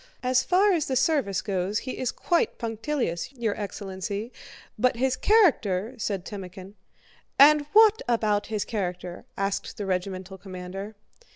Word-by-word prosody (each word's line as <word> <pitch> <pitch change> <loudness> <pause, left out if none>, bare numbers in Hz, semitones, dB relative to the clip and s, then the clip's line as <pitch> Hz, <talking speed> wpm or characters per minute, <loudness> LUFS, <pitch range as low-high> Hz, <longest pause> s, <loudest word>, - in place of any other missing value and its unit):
"As 255 0 +3
far 370 +9 +3
as 325 -4 0
the 265 - -1
service 260 - +1
goes 195 +1 -1
he 255 - -5
is 255 - -1
quite 345 -1 0
punctilious, 225 - -3
your 230 -5 -2
excellency; 200 +2 -5 0.4
but 250 +3 +2
his 260 +2 +1
character..." 250 - +3
said 195 -4 -2
Timókhin. 190 -1 -8 0.6
"And 290 +1 +7
what 440 0 +6
about 215 -3 +1
his 215 -2 -2
character?" 180 -4 -4
asked 195 0 -2
the 205 - -4
regimental 190 0 -3
commander. 190 +2 -7
210 Hz, 135 wpm, -26 LUFS, 190-260 Hz, 0.6 s, And